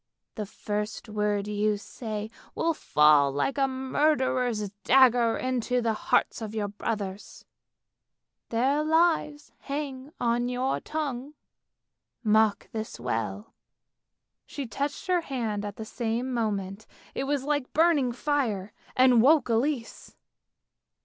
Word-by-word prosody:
The 210 -3 -5
first 210 +2 -4
word 210 -1 0
you 210 0 +1
say 215 0 -6 0.2
will 330 0 +1
fall 150 - +4
like 200 - -1
a 270 - +3
murderer's 260 -5 0
dagger 245 -3 +5
into 250 -1 0
the 230 -2 +1
hearts 215 - +1
of 220 0 -5
your 205 -2 -1
brothers. 205 -1 -5 1.0
Their 270 +6 +1
lives 315 -2 +1
hang 280 -1 -5
on 240 +1 +1
your 250 +2 -1
tongue. 290 -2 -4 0.9
Mark 215 -1 +3
this 220 0 -5
well! 105 -2 -3 0.5
" - - -58
She 280 - -5
touched 285 +7 -3
her 365 -2 +2
hand 230 -9 -3
at 205 -1 -5
the 220 - -7
same 240 +3 -2
moment, 205 -3 -2 0.3
it 270 - -2
was 280 -1 0
like 290 -2 -1
burning 310 -6 +3
fire, 235 -7 -1 0.2
and 255 -2 +6
woke 280 0 +5
Elise. 235 +1 -1
240 Hz, 125 wpm, -27 LUFS, 210-275 Hz, 1.0 s, and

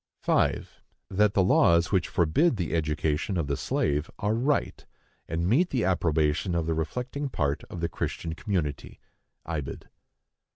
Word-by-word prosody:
5. - - 0 0.3
That 105 +1 +2
the 95 - +4
laws 85 -2 +4
which 95 -3 +2
forbid 110 - +2
the 90 -4 -2
education 80 +3 0
of 85 - 0
the 70 0 -1
slave 75 +2 -1
are 105 +1 0
right, 135 +6 0 0.4
and 85 +2 -1
meet 155 - +3
the 125 -7 0
approbation 80 -1 +1
of 85 -1 0
the 80 - 0
reflecting 125 - -3
part 70 - -1
of 85 - -8
the 85 - +1
Christian 80 0 -4
community. 85 - -3 0.5
(Ibid.) 75 -5 -5
85 Hz, 150 wpm, -27 LUFS, 80-105 Hz, 0.5 s, the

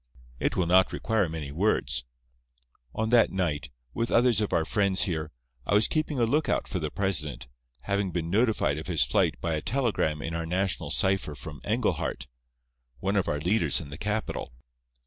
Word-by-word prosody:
"It - - 0
will 90 - +1
not 90 +2 +4
require 105 -6 0
many 80 -3 -5
words. 65 - 0 0.9
"On 110 +1 -1
that 120 -1 +5
night, 90 -6 -1 0.2
with 115 - -1
others 120 -2 +4
of 105 - -1
our 80 - +2
friends 100 -1 +2
here, 80 -4 -2 0.3
I 100 - +1
was 105 - +5
keeping 155 -2 -1
a 120 - +3
lookout 150 +7 +1
for 90 - -3
the 75 -2 -2
president, 75 -11 -1 0.3
having 100 +2 -1
been 85 -2 -3
notified 105 - +2
of 80 - -8
his 85 -5 +2
flight - - +1
by 85 -1 -1
a 75 - -1
telegram 110 - 0
in 80 - -4
our 85 0 -3
national 95 +2 -1
cipher 95 -6 +1
from - - -9
Englehart, - - -1 0.7
one 95 +6 -1
of 100 - +1
our 75 - 0
leaders 85 - +1
in 70 - -9
the 70 - -7
capital. 105 - -2
95 Hz, 180 wpm, -27 LUFS, 80-105 Hz, 0.9 s, that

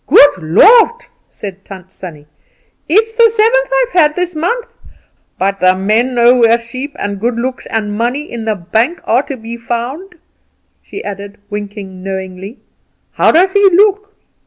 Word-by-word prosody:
"Good 285 -7 +6
Lord!" 450 - +4 0.2
said 195 -1 -9
Tant 190 -1 -12
Sannie; 165 -6 -10 0.6
"it's 445 +6 +2
the 460 0 +5
seventh 460 +3 +2
I've - - -5
had 305 -6 +3
this 360 0 -2
month; 465 +10 -3 0.6
but 195 +1 -1
the 185 0 +3
men 220 +7 0
know 240 +1 +5
where 230 -1 +4
sheep 255 +5 -8
and 200 -1 -4
good 235 +3 -1
looks 255 +2 -4
and 210 -2 -3
money 240 +6 -1
in 235 -7 -7
the 220 -1 0
bank 220 - -1
are 240 +3 +2
to 275 -2 -7
be 230 +1 -8
found," 245 +11 -5 0.7
she 405 - -9
added, 200 0 -8
winking 205 -2 -7
knowingly. 190 +3 -7 0.5
"How - - +3
does 370 +3 +3
he 405 0 +3
look?" 410 +2 +2
235 Hz, 160 wpm, -14 LUFS, -, 0.7 s, Good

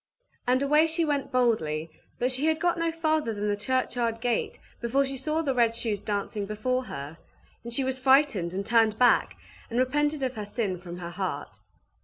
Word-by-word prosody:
And 255 +2 +3
away 300 +3 +4
she 325 +1 0
went 290 -2 -1
boldly; 165 -11 +1 0.3
but 250 +2 0
she 265 +4 0
had 315 0 +2
not 350 -1 +2
got 330 -1 0
farther 310 -8 0
than 205 +1 -2
the 205 - +1
churchyard 240 0 -1
gate 240 -1 -1 0.2
before 265 +4 +2
she 270 0 -4
saw 305 +5 -1
the 275 -3 0
red 235 -2 +2
shoes 220 -3 -1
dancing 205 0 -3
before 255 +5 -1
her; 140 - -7 0.4
and 235 - -7
she 265 +3 0
was 260 0 -2
frightened, 260 - +3
and 195 +1 -2
turned 225 -2 +3
back, 245 0 +3 0.3
and 235 - -3
repented 295 +3 +1
of 260 -1 -1
her 215 -3 -5
sin 200 -5 -2
from 175 -1 -8
her 170 -1 -6
heart. 185 +2 -4
245 Hz, 195 wpm, -27 LUFS, 210-275 Hz, 0.4 s, away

